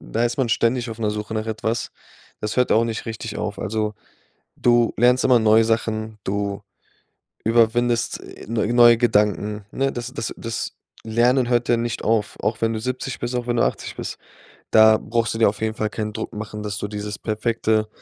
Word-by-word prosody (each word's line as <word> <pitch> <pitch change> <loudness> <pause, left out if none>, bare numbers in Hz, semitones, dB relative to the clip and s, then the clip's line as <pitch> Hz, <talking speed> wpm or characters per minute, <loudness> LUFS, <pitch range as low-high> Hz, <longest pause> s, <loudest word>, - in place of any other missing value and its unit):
da 115 +2 -1
ist 120 0 -1
man 130 -3 +1
ständig 120 +1 +1
auf 110 - -7
'ner 105 -2 0
Suche 105 +1 -5
nach 110 0 -2
etwas. 110 +1 -2 0.5
Das 105 0 -3
hört 125 -1 +2
auch 115 +2 +4
nicht 115 -1 -4
richtig 110 -1 -5
auf. 105 -1 -3
Also, 105 0 -2 0.6
du 120 -1 +3
lernst 125 +2 +4
immer 125 -2 +6
neue 110 +1 +5
Sachen, 110 -1 -1
du 100 0 -2 0.8
überwindest, 115 +1 +2
äh, - - -12
neu 115 -1 0
neue 120 -1 +7
Gedanken, 105 -2 +1
ne? 135 0 0
Das 120 +1 -6
das 115 -6 -4
das 115 -1 -4 0.3
Lernen 120 +3 +2
hört 120 -1 +1
ja 120 - +4
nicht 120 0 -3
auf, 110 -2 0
auch 110 0 -1
wenn 115 0 +1
du 110 - -3
70 130 +2 -4
bist, 120 +1 -3
auch 120 0 -2
wenn 120 - 0
du - - +3
80 - - -3
bist. - - -5 0.5
Da 110 0 +7
brauchst 115 0 -1
du - - -3
dir 115 - +5
auf 100 +1 -4
jeden 110 0 0
Fall 110 -1 -2
keinen 105 0 -4
Druck - - -5
machen, 105 0 -6
dass 105 -1 -4
du 105 - -4
dieses 105 0 -5
perfekte, 110 0 0
115 Hz, 200 wpm, -22 LUFS, 110-120 Hz, 0.8 s, neue